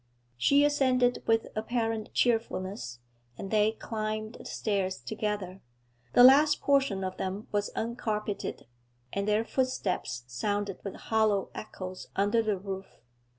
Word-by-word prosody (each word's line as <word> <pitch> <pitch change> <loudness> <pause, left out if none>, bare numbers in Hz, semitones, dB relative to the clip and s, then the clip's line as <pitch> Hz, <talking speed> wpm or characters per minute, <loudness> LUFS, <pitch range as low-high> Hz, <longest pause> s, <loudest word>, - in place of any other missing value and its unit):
She 280 - +4
assented 255 -4 +2
with 225 0 +3
apparent 225 0 -1
cheerfulness, 190 - -1 0.4
and 195 - -6
they 215 0 +3
climbed 215 0 -4
the - - -12
stairs 195 -3 -1
together. 210 -4 -3 0.5
The 245 - +8
last 290 +4 +7
portion 270 -9 +2
of 185 0 -4
them 190 +3 -4
was 205 0 0
uncarpeted, 215 -5 -3 0.5
and 200 +1 -1
their 210 +2 +2
footsteps 195 - -1
sounded 205 - -2
with 195 - -5
hollow 215 -3 +1
echoes 185 -3 -7
under 205 +4 +3
the 215 -3 0
roof. 190 0 -7
215 Hz, 125 wpm, -29 LUFS, 195-230 Hz, 0.5 s, The